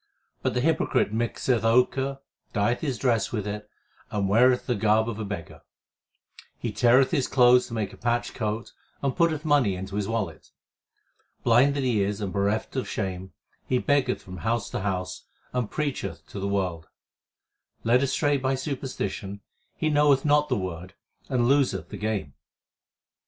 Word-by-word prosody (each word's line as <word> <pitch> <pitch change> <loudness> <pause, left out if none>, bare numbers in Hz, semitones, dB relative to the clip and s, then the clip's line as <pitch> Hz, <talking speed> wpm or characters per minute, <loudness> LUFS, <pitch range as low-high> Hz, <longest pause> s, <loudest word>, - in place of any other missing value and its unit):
But - - -1
the 125 - +1
hypocrite 155 -7 +1
mixeth 115 +1 0
ochre, 130 +4 +2 0.3
dyeth 115 +3 +1
his 140 -6 -2
dress 115 -6 +1
with 105 -4 -2
it, 105 0 -5 0.4
and 100 -2 -1
weareth 125 +5 +4
the 125 - +1
garb 110 +1 +2
of 115 -2 -4
a - - -2
beggar; 100 -5 -6 1.0
He - - -3
teareth 125 +2 +4
his 140 -7 +1
clothes 125 -1 +5
to 115 - -6
make 105 -3 -2
a - - -12
patched 120 0 -1
coat, 110 0 -3 0.3
and 135 -2 0
putteth 165 -3 +1
money 140 -10 +3
into 95 +2 -6
his 105 - -1
wallet; 105 -8 -3 0.9
Blind 125 +4 +4
that 140 - -1
he 120 -5 +2
is 100 +1 -1
and 100 -3 -3
bereft 100 +4 -1
of 130 - -2
shame, 95 -3 -4 0.3
he 130 - +2
beggeth 135 -2 +1
from 90 0 -9
house 115 +2 -1
to - - -2
house 95 -2 -3 0.3
and 125 -4 -1
preacheth 140 - -3
to 100 - -6
the 100 - -2
world; 90 -5 -2 1.0
Led 120 +3 +4
astray 145 +1 +1
by 130 0 0
superstition 125 -7 -4 0.3
he 155 - 0
knoweth 145 -2 +4
not 150 0 +3
the 125 - +1
Word 90 -1 -5 0.3
and 125 -3 +2
loseth 125 - +2
the - - -7
game. 105 -10 -2
115 Hz, 165 wpm, -26 LUFS, 100-130 Hz, 1.0 s, clothes